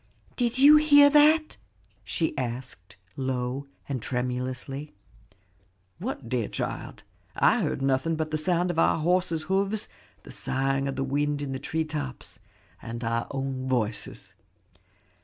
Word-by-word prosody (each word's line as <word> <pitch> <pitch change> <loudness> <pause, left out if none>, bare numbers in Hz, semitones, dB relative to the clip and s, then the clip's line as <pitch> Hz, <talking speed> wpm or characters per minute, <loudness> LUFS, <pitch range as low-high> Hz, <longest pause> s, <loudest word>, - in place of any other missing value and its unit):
"Did 240 -1 0
you 290 +3 +8
hear 290 -1 +7
that?" 310 +1 +4 0.5
she 160 - -1
asked 120 -7 -6 0.2
low 130 +1 -3 0.2
and 135 -4 -3
tremulously. 130 +3 -3 1.0
"What, 200 - -5
dear 120 -3 -1
child? - - -5 0.3
I - - +4
heard 135 - -2
nothing 135 +4 +1
but 155 0 -3
the 155 - 0
sound 175 +2 +1
of 165 - -2
our - - +4
horses' 170 0 +1
hoofs, 195 +5 0 0.4
the - - -11
sighing 135 +1 -1
of 135 - -3
the 135 - -1
wind 145 +2 0
in 140 - -4
the 130 - -3
tree 160 +3 -2
tops, 145 -8 -6 0.4
and 115 +1 -6
our 115 0 -1
own 135 -1 -3
voices." 115 -4 -1
140 Hz, 140 wpm, -27 LUFS, 130-175 Hz, 1.0 s, you